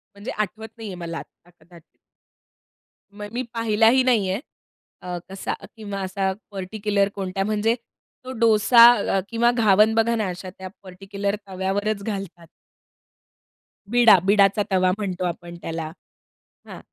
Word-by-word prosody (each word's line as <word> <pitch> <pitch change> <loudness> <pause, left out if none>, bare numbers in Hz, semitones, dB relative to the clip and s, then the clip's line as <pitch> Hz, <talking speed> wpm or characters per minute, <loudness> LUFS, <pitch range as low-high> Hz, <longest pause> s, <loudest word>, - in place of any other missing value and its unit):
म्हणजे 200 +4 -6
आठवत 215 +2 -4
नाही 225 - -8
आहे 185 - -6
मला 170 -1 -6
आता 175 - -16
कदा 175 0 -19 1.4
मग 205 0 -7
मी 245 - -2
पाहिलाही 230 +3 +3
नाही 225 -7 +2
आहे. 190 +4 -1 0.6
अ, 180 -1 -5
कसा 195 0 -4 0.2
किंवा 205 -3 -6
असा 190 0 -1 0.2
पार्टिक्युलर 200 +1 -1
कोणत्या 195 0 -3
म्हणजे 215 +2 +1 0.5
तो 255 - -6
डोसा 230 +1 +6 0.3
अ, - - +3
किंवा 235 +1 +2
घावण 215 -2 +4
बघा 230 +1 +2
ना 215 -4 -1
अशा 185 +1 -7
त्या 190 0 -7 0.2
पार्टिक्युलर 195 +2 -4
तव्यावरच 195 +2 -2
घालतात. 195 -5 -6 1.4
बिडा 240 -5 +7
बिडाचा 200 0 +4
तवा 185 -1 +3
म्हणतो 190 -3 -4
आपण 175 0 -5
त्याला. 160 -1 -5 0.8
हां, - - -9
200 Hz, 135 wpm, -23 LUFS, 185-220 Hz, 1.4 s, बिडा